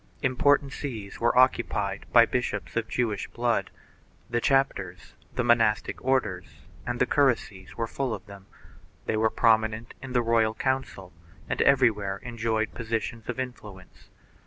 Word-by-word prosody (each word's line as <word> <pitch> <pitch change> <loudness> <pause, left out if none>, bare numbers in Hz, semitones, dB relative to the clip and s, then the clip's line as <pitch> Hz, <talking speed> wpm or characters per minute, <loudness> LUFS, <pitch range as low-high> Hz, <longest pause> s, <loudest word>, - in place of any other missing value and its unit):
Im 130 -2 +1
portant 145 +1 +3
sees 110 -9 -6
were 120 +1 +2
occupied 105 -6 +2
by 120 -1 +7
bishops 125 +2 -3
of 115 -1 -1
Jewish 110 -6 -1
blood; 120 0 -1 0.6
the 120 0 0
chapters, 95 -11 0 0.2
the - - 0
monastic 115 -2 +2
orders 110 -9 -1 0.2
and 120 0 -2
the - - +4
curacies 115 -9 0
were 115 - 0
full 130 +2 -3
of 105 - -5
them; 100 -2 -13 0.6
they - - -1
were 110 +1 +2
prominent 110 +1 +1
in 135 -1 -7
the 120 -1 +2
royal 115 -1 +2
council 130 -10 -3 0.3
and - - -1
everywhere 110 -8 +3
enjoyed 115 -2 -2
positions 115 -1 -4
of 125 - -3
influence. 105 -8 -8
115 Hz, 145 wpm, -27 LUFS, 105-125 Hz, 0.6 s, by